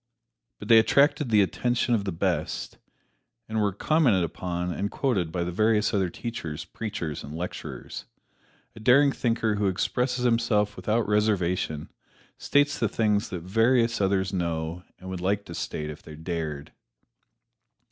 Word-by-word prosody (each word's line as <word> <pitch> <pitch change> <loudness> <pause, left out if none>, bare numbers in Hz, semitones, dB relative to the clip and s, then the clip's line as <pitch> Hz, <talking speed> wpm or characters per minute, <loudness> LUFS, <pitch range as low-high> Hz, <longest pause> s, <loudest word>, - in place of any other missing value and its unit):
But - - -9
they 115 -1 +8
attracted 140 +3 +3
the 105 -2 +5
attention 120 +5 0
of 105 -4 +1
the 95 - -1
best, 85 -2 -2 0.7
and 110 0 -1
were 100 -1 +2
commented 120 - +2
upon 90 +1 -3
and 100 +3 -2
quoted 100 - 0
by 85 0 -1
the 90 - -3
various 110 +4 +2
other 95 -3 +1
teachers, 85 -7 -5
preachers 95 -9 -5
and 75 +2 -8
lecturers. 90 +2 -6 0.7
A - - -10
daring 135 +6 +5
thinker 115 -4 0
who 100 -1 +1
expresses 125 +6 0
himself 105 -3 +2
without 110 +4 0
reservation 95 -7 0 0.5
states 145 0 +2
the 115 - +1
things 105 -1 +1
that 90 -4 -5
various 115 +4 +2
others 95 0 +1
know 85 -1 -2 0.2
and 95 - -11
would 90 -1 -5
like 100 +2 0
to - - -8
state 75 0 -4
if 75 - -11
they 75 - -11
dared. 80 -2 -4
100 Hz, 150 wpm, -26 LUFS, 85-115 Hz, 0.7 s, they